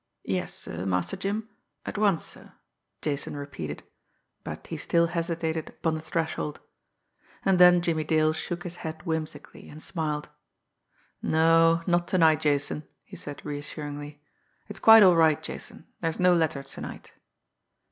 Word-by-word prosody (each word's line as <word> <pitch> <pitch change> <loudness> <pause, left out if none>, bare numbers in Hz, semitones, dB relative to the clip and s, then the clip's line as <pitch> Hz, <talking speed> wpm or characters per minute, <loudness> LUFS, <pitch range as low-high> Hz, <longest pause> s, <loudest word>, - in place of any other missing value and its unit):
"Yes, - - -1
sir, 90 +3 -5
Master 90 -1 0
Jim, 210 +3 -3 0.4
at - - -5
once, 205 -5 +2
sir," - - -11 0.5
Jason 145 -1 -2
repeated 85 - -6 0.6
but - - -7
he - - -6
still 170 0 +2
hesitated 165 -2 -2
upon 160 - -2
the 155 - -3
threshold. 160 -1 -3 0.9
And 190 -2 +3
then 180 -1 +7
Jimmie 160 -2 0
Dale 155 0 +2
shook 175 +2 -4
his 175 0 -7
head 160 -1 -6
whimsically 155 -3 -5
and 150 - -11
smiled. 155 -3 -3 0.9
"No 165 +1 +4
not 175 -1 +1
to 185 - +1
night, 160 -3 +5
Jason," 145 +1 0 0.2
he - - -12
said 145 -1 -8
reassuringly. 145 0 -6 0.4
"It's 205 -2 -6
quite 225 0 +9
all 180 -2 +7
right, 160 -2 +4
Jason - - -8
there's 165 -1 -2
no 180 0 +5
letter 160 -5 +1
to 135 - -7
night." - - -8
160 Hz, 145 wpm, -27 LUFS, 150-175 Hz, 0.9 s, quite